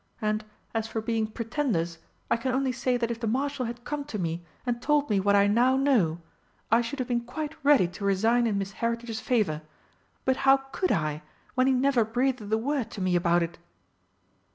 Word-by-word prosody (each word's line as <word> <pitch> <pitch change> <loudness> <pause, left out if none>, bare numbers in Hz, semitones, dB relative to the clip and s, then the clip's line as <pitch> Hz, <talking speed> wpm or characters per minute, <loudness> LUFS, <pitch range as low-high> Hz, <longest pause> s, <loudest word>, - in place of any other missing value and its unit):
And, 215 -1 0 0.3
as 225 -1 -1
for 225 - -3
being 220 0 -1
pretenders, 215 - -2 0.3
I - - +5
can 250 +2 -2
only 265 0 +1
say 250 +1 0
that 235 -1 -1
if 230 - -4
the 230 - -2
Marshal 270 +3 -1
had 240 +1 -7
come 295 +3 -3
to 255 -7 -5
me 170 -2 -2 0.2
and 240 -1 -1
told 290 -2 +2
me 200 - +3
what 200 +1 +3
I 200 0 +5
now 245 +6 +3
know, 225 - +2 0.5
I 230 +1 +5
should 240 +4 -4
have 255 -2 -2
been 240 -1 0
quite 295 +6 -5
ready 280 -10 +5
to 190 +3 -9
resign 225 +5 +3
in 210 -3 0
Miss 195 0 -3
Heritage's 230 +1 -3
favour. 215 -12 0 0.6
But 260 0 +2
how 270 0 +5
could 270 +7 -2
I, 155 -1 0 0.3
when 255 0 +3
he 265 - +4
never 260 -2 +3
breathed 240 -1 -1
a 220 - +4
word 255 0 -1
to 200 - -6
me 185 -1 +1
about 175 0 +3
it?" 170 0 -6
235 Hz, 205 wpm, -27 LUFS, 205-260 Hz, 0.6 s, I